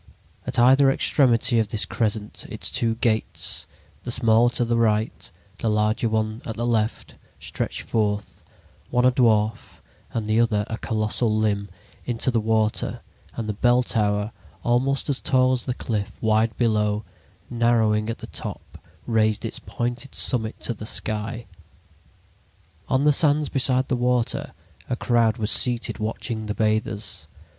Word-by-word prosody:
At - - -2
either 135 +3 +6
extremity 120 -3 +3
of 110 - +1
this 110 0 -1
crescent 105 -2 -2
its - - -4
two 115 -1 +1
"gates," 110 -1 0 0.4
the - - -6
smaller 120 0 +4
to 120 0 -1
the 120 0 0
right, 110 -1 0 0.3
the 115 - 0
larger 105 +2 +1
one 110 0 -1
at 110 - -5
the 120 - -2
left, 115 -2 -1 0.3
stretched - - -4
forth—one 105 +3 -3
a 130 - +6
dwarf 110 -4 +1 0.3
and 110 -2 -3
the 110 +1 +2
other 110 -3 +2
a 110 - -3
colossal 110 +1 0
limb—into 105 +3 -2
the 120 - +2
water, 110 0 0 0.3
and 115 - -4
the 105 - -1
bell 120 +4 +3
tower, 105 -2 0 0.3
almost 130 +3 +1
as 140 -2 -1
tall 130 -1 +3
as 125 -1 -1
the 125 - -1
cliff, 105 -6 -3
wide 110 0 +1
below, 105 -2 +1 0.5
narrowing 115 -2 +2
at 115 - -3
the - - -8
top, - - -7 0.3
raised 110 -2 +1
its - - -4
pointed 120 +3 -4
summit 110 -4 0
to 120 - -1
the 105 0 -8
sky. 110 +2 -3 1.4
On 130 +1 +2
the 150 0 +5
sands 150 0 +2
beside 130 -1 +1
the 130 - 0
water 125 -1 0 0.4
a - - 0
crowd 120 -2 +2
was 110 -2 -1
seated 120 -2 +2
watching 110 0 -3
the 105 - -3
bathers. 105 -6 -1
115 Hz, 150 wpm, -24 LUFS, 110-120 Hz, 1.4 s, either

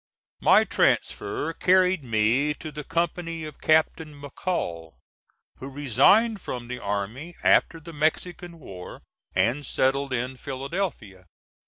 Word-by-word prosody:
My - - +6
transfer 145 +10 0
carried 185 -2 +3
me 120 +6 +2
to 155 - -8
the 150 0 -7
company 165 +1 -2
of 155 - -10
Captain 155 -1 +1
McCall, 90 - -4 0.6
who 135 - -7
resigned 195 - +3
from 120 -2 -6
the 125 0 -5
army 110 - -4
after 165 - +4
the 165 +1 -11
Mexican 170 +3 -2
war 95 - -10 0.3
and 115 +10 +1
settled 135 +1 0
in 130 +1 -2
Philadelphia. 135 - -5
145 Hz, 120 wpm, -25 LUFS, 120-165 Hz, 0.6 s, My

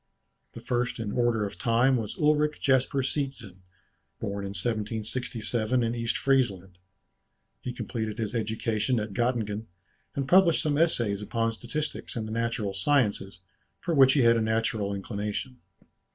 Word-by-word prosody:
The - - -9
first 120 0 -1
in 110 -3 -3
order 120 -3 +1
of 100 - -7
time 120 +3 +3
was 110 -4 -3
Ulric 150 0 +2
Jasper 135 0 +2
Seetzen, 135 -9 -3 0.6
born 100 0 -3
in 100 +1 -6
1767 110 +2 -1
in 115 0 0
East 115 -1 -1
Friesland; 95 -10 0 0.8
he 125 - -4
completed 110 -3 -4
his 110 -2 -3
education 110 +1 0
at 105 -1 -4
Göttingen, 110 -2 -1 0.5
and 140 -1 -2
published 180 -1 +5
some 150 -1 +1
essays 120 -11 +1
upon 115 +2 0
statistics 145 +7 -5
and 110 -2 -3
the - - -6
natural 115 -3 -1
sciences, 100 -4 +1 0.4
for 175 - -2
which 135 -3 +7
he 140 - +3
had 115 -1 +5
a - - +1
natural 110 -2 0
inclination. 105 +5 -4
115 Hz, 145 wpm, -28 LUFS, 105-130 Hz, 0.8 s, which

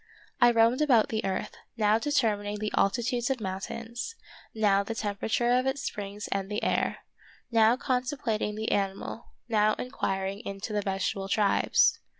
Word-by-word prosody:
I 240 - +7
roamed 230 +3 +3
about 250 -8 +4
the 220 -1 -2
earth, 190 -1 -3 0.2
now 215 0 +3
determining 215 -7 0
the 210 0 -3
altitudes 240 +4 +1
of 265 -2 0
mountains, 225 - -5 0.4
now 205 -2 +3
the 225 +3 -5
temperature 225 +3 0
of 255 +1 +3
its 270 +1 -1
springs 205 0 -5
and 195 0 -1
the 210 +1 -3
air; - - 0 0.5
now 225 +1 +5
contemplating 250 -5 -1
the 220 +1 -2
animal, 195 +3 -2 0.2
now 215 -2 +3
inquiring 195 -6 -3
into 200 -1 -6
the 210 - +1
vegetable 195 0 -2
tribes. 205 -1 +3
220 Hz, 150 wpm, -28 LUFS, 200-240 Hz, 0.5 s, I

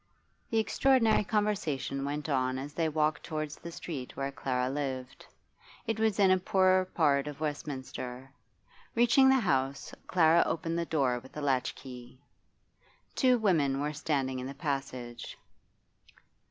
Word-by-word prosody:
The 225 - 0
extraordinary 225 0 +3
conversation 190 - -1
went 145 +2 -3
on 130 -3 0
as 140 +2 -6
they 165 0 0
walked 150 -1 0
towards 155 -1 -4
the 170 - -9
street 145 -6 -7
where 135 0 -2
Clara 125 -2 -1
lived. 130 -2 -4 0.6
It 225 -1 -2
was 220 -3 +2
in 195 -2 +5
a 185 - +4
poor 185 0 +3
part 145 -6 +1
of 145 -1 -7
Westminster. 135 -4 -5 0.6
Reaching 240 +3 +5
the 265 0 +5
house, 135 -7 -1
Clara 170 -1 +5
opened 165 0 -2
the 170 - -1
door 130 -6 +1
with 130 +4 -14
a - - -3
latchkey. 130 -2 -3 1.0
Two 255 -2 +4
women 155 - +2
were 150 +1 -2
standing 140 -4 -1
in 130 - -5
the 140 - -7
passage. 135 -5 -4
150 Hz, 140 wpm, -30 LUFS, 135-185 Hz, 1.0 s, in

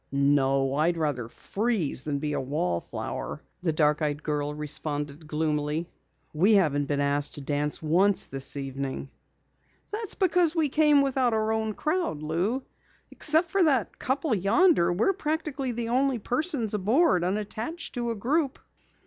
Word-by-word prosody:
"No, 135 -1 +2
I'd 160 +4 +1
rather 140 -7 -2
freeze 200 - -2
than 145 -2 -1
be 150 +1 -3
a - - -1
wallflower," 90 - -3 0.2
the 175 -2 +1
dark 150 0 +2
eyed 150 0 -1
girl 150 -1 -1
responded 150 0 -2
gloomily. 150 +1 -1 0.4
"We 185 +8 +4
haven't 145 -7 +2
been 145 0 -1
asked 145 0 0
to 145 - -6
dance 145 +2 -2
once 185 +6 +3
this 135 +1 -2
evening." 135 0 -5 0.8
"That's 430 -1 -2
because 355 -3 +2
we 315 -3 +2
came 295 -1 +4
without 260 -3 +1
our 220 0 0
own 220 -1 -1
crowd, 310 - -1
Lou. 185 - -1 0.5
Except 320 +3 +2
for 390 - +2
that 275 - +1
couple 270 +1 0
yonder, 200 - +3
we're 215 - +2
practically 300 -6 -2
the 235 -1 -3
only 260 +1 +2
persons 245 - 0
aboard 210 - +3
unattached 215 - -3
to 240 -1 -2
a 230 - -2
group." 275 +6 0
185 Hz, 150 wpm, -27 LUFS, -, 0.8 s, We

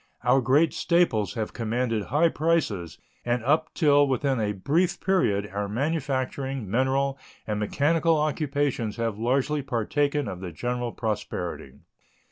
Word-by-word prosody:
Our 135 - +4
great 145 +6 +3
staples 170 - +1
have 110 -2 -3
commanded 115 -1 -1
high 155 +6 +3
prices, 150 - -1 0.3
and 120 -1 -1
up 155 +5 +2
till 145 -3 +4
within 135 -1 0
a 105 -1 0
brief 150 - 0
period 105 - +1
our 100 0 -2
manufacturing, 135 -1 -2
mineral, 135 +5 0 0.3
and 105 -1 -2
mechanical 160 +9 +2
occupations 145 -6 -1
have 115 -3 -2
largely 135 +5 +1
partaken 140 +3 0
of 95 -3 -5
the 90 -1 -6
general 120 +5 -3
prosperity. 105 - -4
130 Hz, 130 wpm, -26 LUFS, 110-145 Hz, 0.3 s, Our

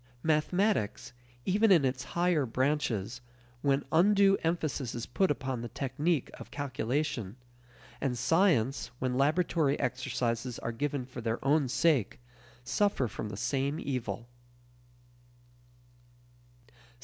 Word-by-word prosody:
Mathematics, 160 - +1 0.3
even 210 +3 +3
in 165 -7 +6
its 130 0 -1
higher 170 -6 +2
branches, 125 -3 -1 0.4
when 140 0 +1
undue 195 +3 +5
emphasis 155 -7 -1
is 120 - -4
put 190 +10 +1
upon 130 -4 -2
the 120 - -4
technique 140 +5 -1
of - - -10
calculation, 130 -5 -2 0.7
and 130 -3 -1
science, 145 - +2
when 130 -1 -1
laboratory 150 +1 +2
exercises 125 -1 -2
are 115 - -3
given 140 +2 -2
for 125 -1 -8
their 115 0 -1
own 145 0 +3
sake, 135 - +2 0.4
suffer 170 0 +1
from 110 -1 -5
the 95 - -6
same 140 +6 -1
evil. 125 -4 -4
135 Hz, 115 wpm, -30 LUFS, 125-160 Hz, 0.7 s, in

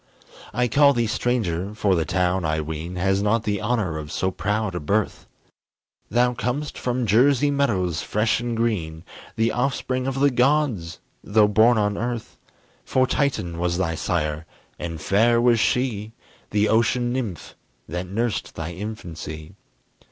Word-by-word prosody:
I 125 +3 +1
call 140 +4 +5
thee 120 -2 +1
stranger, 105 -5 -1
for 100 -2 +2
the 85 -3 +1
town, 90 0 0
I 80 0 0
ween, 80 +3 -5
Has 95 +2 +1
not 105 +2 +1
the 105 -2 -1
honor 100 -10 -1
of 75 -1 -7
so 95 - -1
proud 105 +3 -1
a 90 - -2
birth: 100 +7 -1 0.8
Thou 125 +1 +2
com'st 125 +5 -3
from 125 0 -1
Jersey 135 +6 +4
meadows, 95 - 0
fresh 105 +3 +1
and 120 -1 -3
green, 85 -9 -1 0.3
The 115 +1 +1
offspring 130 0 -1
of 135 0 -2
the 140 0 +4
gods, 125 - +1 0.3
though 105 0 +4
born 110 +3 +4
on 105 -1 0
earth; 120 -1 -4 0.4
For 130 0 +2
Titan 120 - -1
was 85 0 0
thy 85 -3 0
sire, 75 -1 -2 0.3
and 85 -2 -5
fair 115 +9 +3
was 120 -1 +4
she, 110 -2 0 0.4
The 105 +1 +2
ocean 120 +2 +2
nymph 110 -11 -4 0.3
that 90 +4 -4
nursed 110 +3 -2
thy 80 +1 -4
infancy. 85 -6 -7
105 Hz, 150 wpm, -23 LUFS, 90-120 Hz, 0.8 s, call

